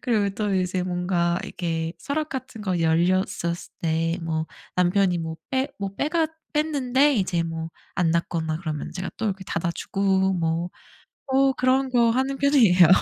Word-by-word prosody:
그리고 215 -5 +1
또 205 -1 -1
이제 185 0 0
뭔가 175 -1 0
이렇게 165 -2 -3
서랍 305 - -2
같은 255 -4 -6
거 185 -4 -1
열렸었을 170 +1 +1
때 165 +1 0
뭐 160 -1 -2 0.3
남편이 180 0 +3
뭐 160 -1 -4
빼 265 +1 +1
뭐 195 -1 -3
빼갔 315 +1 +1 0.2
뺐는데 290 -2 +2
이제 185 -6 +1
뭐 165 -1 -4 0.3
안 175 -2 +2
닫거나 160 -1 -1
그러면 155 -4 -4
제가 185 +1 -4
또 220 - -1
이렇게 195 -1 -3
닫아주고 190 +3 0
뭐 170 +1 -1 0.6
어 270 0 +4
그런 260 +1 +2
거 235 -2 +4
하는 265 +3 0
편이에요. 225 - +6
185 Hz, 295 characters per minute, -24 LUFS, 170-250 Hz, 0.6 s, 편이에요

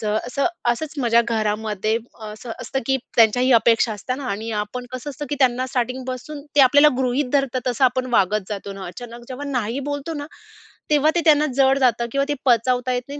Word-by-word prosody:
जर 210 -2 -1
असं 275 +5 0 0.2
असंच 290 +6 -3
माझ्या 235 -2 +4
घरामध्ये 215 -1 -1 0.3
असं 215 +2 -8
असतं, 270 - -3
की 265 0 +2 0.2
त्यांच्याही 245 +3 +4
अपेक्षा 230 0 +4
असते 215 +5 -4
ना 280 - -7
आणि 220 +3 -4
आपण 245 +4 -5
कसं 255 +3 -5
असतं, 290 +2 -7
की - - +1
त्यांना 255 -1 +2
स्टार्टिंगपासून 255 +3 -4
ते - - +7
आपल्याला 285 +3 +7
गृहीत 255 +1 0
धरतात 275 -3 +1
तसं 250 +2 +1
आपण 255 0 +1
वागत 210 -1 +2
जातो 200 -1 -5
ना. 195 -1 -8
अचानक 235 +6 -9
जेव्हा 260 +3 -6
नाही 245 0 -2
बोलतो 285 +3 -4
ना 290 -1 -5 0.6
तेव्हा 300 0 +4
ते 345 - +2
त्यांना 300 -1 +5
जड 270 0 +4
जातं 240 -2 +2
किंवा 275 0 +1
ते 290 - +2
पचवता 250 +1 +2
येत 245 - -1
नाही. 285 +1 -7
250 Hz, 195 wpm, -21 LUFS, 225-275 Hz, 0.6 s, ते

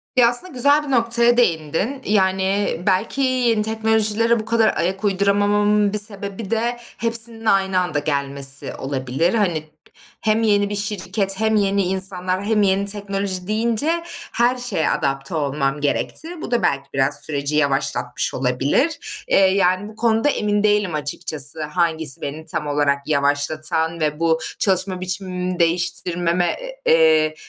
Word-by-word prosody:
Ya, 240 -2 +5
aslında 320 +9 +2
güzel 285 +4 +4
bir 275 - -5
noktaya 235 0 +3
değindin. 180 - 0
Yani, 190 -1 +1
belki 205 +8 0
yeni 250 -4 +2
teknolojilere 220 +1 +1
bu 215 - -6
kadar 225 -1 +1
ayak 190 +4 -2
uyduramamamın 205 +1 +1
bir 210 - +3
sebebi 200 0 -2
de 235 +2 -1 0.2
hepsinin 230 -1 -2
aynı 190 -2 +2
anda 155 -5 -1
gelmesi 140 -1 0
olabilir. 135 - -2
Hani, 175 -8 0 0.6
hem 220 +1 +1
yeni 205 -2 +2
bir 205 - -3
şirket 195 -1 0
hem 220 0 +1
yeni 200 -1 +1
insanlar 185 0 0
hem 210 0 +1
yeni 195 0 +1
teknoloji 200 -2 -2
deyince 235 +10 0 0.3
her 245 +2 +1
şeye 225 -10 -1
adapte 135 +1 -2
olmam 140 -1 -2
gerekti. 320 - -1
Bu - - -7
da 240 - 0
belki 140 0 -1
biraz 135 +1 +1
süreci 145 0 -3
yavaşlatmış 135 -4 -1
olabilir. 135 - 0 0.3
Eee, - - +2
yani 190 0 +2
bu 215 - -14
konuda 225 +4 +1
emin 210 -4 0
değilim 205 -5 +1
açıkçası 150 0 0
hangisi 160 -2 +1
beni 150 +3 -6
tam 150 -2 -3
olarak 145 -1 0
yavaşlatan 155 +3 0
ve 150 0 -2
bu 165 -1 +1 0.2
çalışma 185 -1 +1
biçimimi 185 -1 -2
değiştirmeme, 175 0 0 0.3
eee, 155 -1 +3
190 Hz, 140 wpm, -20 LUFS, 155-220 Hz, 0.6 s, Ya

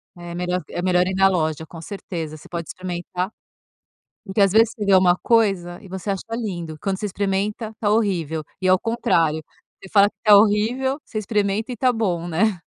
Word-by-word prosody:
É 175 0 -8
melhor 180 0 -1
é 175 - -4
melhor 180 0 +2
ir 190 - -2
na 195 0 +5
loja, 160 -4 0
com 165 +1 -11
certeza, 165 -4 -6
você - - -15
pode 170 -2 -5
experimentar, 180 +1 -4 0.9
porque, 190 +2 -4
às 195 -2 +5
vezes, 225 +1 +5
você 210 - -5
vê 200 - +2
alguma 185 -1 +5
coisa 195 -7 +1
e 195 - -13
você 190 +2 -4
acha 195 - -3
lindo, 175 -9 -5
quando 195 -1 -2
você 210 - -2
experimenta, 205 +3 -2
tá 205 - +1
horrível 175 -8 0 0.2
e 185 - +1
ao 185 0 +5
contrário, 165 -9 +1 0.4
você 195 - -12
fala 200 -1 +6
que - - -37
tá 210 -2 +8
horrível, 230 +7 +2
você 215 - -7
experimenta 210 +2 -1
e 240 - -6
tá 255 +1 +3
bom, 180 -7 -1
né. 185 +3 +1
190 Hz, 200 wpm, -22 LUFS, 175-210 Hz, 0.9 s, tá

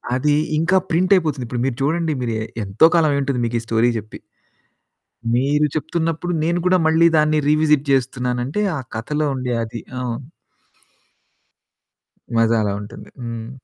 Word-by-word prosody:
అది 145 +3 +2 0.2
ఇంకా 185 +4 +3
ప్రింటైపోతుంది. 165 -6 +2
ఇప్పుడు 120 0 -3
మీరు 135 - -1
చూడండి 160 +1 0
మీరు 115 -2 -2 0.3
ఎంతో 100 +11 +4
కాలమయుంటుంది 140 -5 +1
మీకీ 115 0 -1
స్టోరీ 115 +2 +2
చెప్పి. 110 +1 -11 1.2
మీరు 145 +4 +2
చెప్తున్నప్పుడు 165 +2 -2
నేను 170 +2 +1
కూడా 185 0 +4
మళ్ళి 165 +1 +5
దాన్ని 155 0 +3
రీవిజిట్ 150 -1 +3
చేస్తున్నానంటే 125 +5 -1 0.2
ఆ - - -4 0.2
కథలో 150 +7 -2
ఉండే 125 -1 -2
అది 115 +1 -7 0.2
అవును. 125 +3 -5 2.1
మజా 115 0 +3
అలా 100 -1 -1
ఉంటుంది. 105 0 -11
హ్మ్. 115 -1 -6
140 Hz, 130 wpm, -20 LUFS, 120-160 Hz, 2.1 s, మళ్ళి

